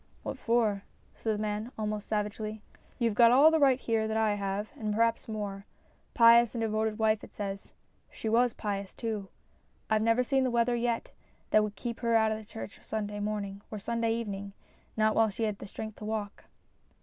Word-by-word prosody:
" - - -32
What - - -5
for? 220 -4 +1 0.2
" - - -34
said 220 -2 -1
the - - -4
man, 215 +3 -3
almost 215 -1 -3
savagely. 215 0 -3 0.3
"You've 235 -4 +1
got 230 +2 +7
all 280 +6 +7
the 320 - +3
right 270 -3 +4
here 225 -3 0
that 220 0 -1
I 220 -1 +2
have, 200 +1 -3
and 215 -1 -2
perhaps 230 +1 +1
more. 205 -2 -5 0.5
Pious 235 0 +6
and 230 - -1
devoted 215 0 0
wife 220 -1 +2
it - - -12
says. 200 -1 -5 0.4
She - - -6
was 235 +2 +3
pious 200 -2 -4
too. 215 -4 -4 0.6
I've 215 0 +3
never 230 +3 +3
seen 265 +1 +2
the 255 - +1
weather 240 0 +2
yet 235 -1 -1 0.4
that 215 - +6
would 210 -1 -4
keep 235 -2 -5
her 230 -1 +1
out 220 -1 +4
of 215 - -2
this 215 - -13
church 110 - -8
Sunday 210 -1 -4
morning 205 -1 -3
or 215 - -5
Sunday 230 +2 -1
evening, 200 -3 -5 0.4
not 215 0 +3
while 225 0 +4
she 210 +3 -4
had 210 -2 -2
strength 220 +1 -7
to 210 - -8
walk." 215 -2 -4
220 Hz, 200 wpm, -30 LUFS, 210-230 Hz, 0.6 s, got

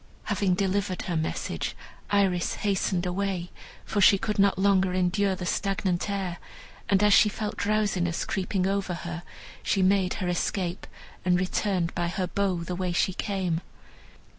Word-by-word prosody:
Having 200 -3 +1
delivered 190 -1 -1
her 175 - -2
message, 160 0 -2 0.3
Iris 190 -4 +2
hasted 190 -3 0
away, 180 -1 -2 0.3
for 205 - 0
she 200 +1 +7
could 210 0 -2
not 200 -1 +4
longer 190 -1 +3
endure 190 +2 +1
the 180 - -5
stagnant 195 0 -1
air, 190 -3 -2 0.5
and 200 0 +4
as 210 -1 +6
she 210 - +6
felt 210 0 -4
drowsiness 200 -5 0
creeping 190 0 -1
over 195 -2 -1
her, 170 0 -5 0.4
she 195 - +1
made 190 -1 +3
her 185 -4 -3
escape, 180 0 -2 0.4
and 180 -1 +3
returned 185 -1 0
by 175 0 -1
her 180 +2 -1
bow 185 -2 -1
the 180 - -4
way 180 0 -2
she 180 +2 +1
came. 185 -4 -1
190 Hz, 155 wpm, -27 LUFS, 180-200 Hz, 0.5 s, she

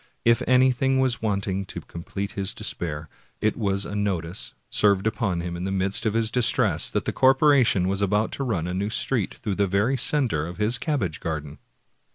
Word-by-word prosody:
^ - - -30 0.2
If 115 0 +4
anything 130 +1 +3
was 130 -2 +1
wanting 100 -2 -1
to - - -7
complete 100 +4 -6
his 100 -1 -2
despair, 80 -7 -4 0.3
it 110 - +1
was 100 -3 0
a 105 - -6
notice, 95 -5 -3 0.2
served 100 -2 +3
upon 110 -6 -1
him 85 0 -4
in 85 - -5
the 95 - -2
midst 95 +3 +1
of 110 - -1
his 115 -1 +1
distress, 125 -1 +2
that - - -2
the - - -2
corporation 130 - +4
was 100 +1 -1
about 105 +2 +1
to 140 - -3
run 100 -11 -1
a 90 - -3
new 100 +3 -1
street 115 -2 -1
through 105 - -4
the 100 +1 +1
very 105 +8 +1
center 120 - +1
of 85 0 -8
his 115 +5 +1
cabbage 110 - -2
garden. 75 -2 -5
100 Hz, 200 wpm, -24 LUFS, 95-120 Hz, 0.3 s, If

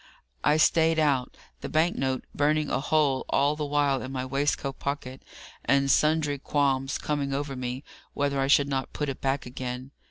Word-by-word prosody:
I 150 +1 +4
stayed 160 +1 +4
out, 140 -5 +1 0.2
the - - -6
bank 160 +3 +2
note 130 -1 -1
burning 150 +1 +1
a 125 - +1
hole 145 -2 +1
all 145 +2 +2
the 150 -1 -3
while 145 -2 +1
in 130 - -6
my 130 -1 -3
waistcoat 140 0 -1
pocket, 135 -2 -4 0.4
and 140 0 +3
sundry 150 -2 +2
qualms 135 -1 0
coming 140 -2 -2
over 140 -1 -3
me 125 +1 -4 0.3
whether 140 -1 0
I 135 - +1
should 140 0 +4
not 135 -1 -3
put 150 -1 -2
it 135 - -6
back 135 +1 -1
again. 125 +1 -6
140 Hz, 180 wpm, -27 LUFS, 135-150 Hz, 0.4 s, I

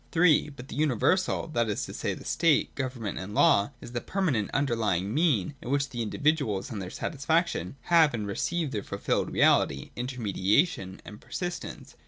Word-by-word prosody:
(3) 165 -3 +4
But 135 -3 -11
the - - -7
universal, 155 - +1
that 120 -6 0
is 105 - -2
to - - -9
say - - -2
the - - -12
state, 165 -3 +2
government, 125 -6 -4
and 100 +3 -7
law, 100 +4 +4
is - - -9
the 120 -1 -3
permanent 145 - 0
underlying 110 -8 0
mean 145 - +2
in - - -7
which 140 0 +1
the 120 - -3
indi 110 - -4
viduals 140 -10 +1
and 105 -3 -4
their 90 - -5
satisfaction 150 - -1
have 160 -4 +4
and 105 -2 -3
receive 155 - -2
their 105 -4 -2
fulfilled - - -2
reality, 70 -1 +2
inter 125 +1 -4
mediation, 100 - +1
and 105 +1 -11
persistence. 175 -1 -6
125 Hz, 180 wpm, -28 LUFS, 105-155 Hz, -, 3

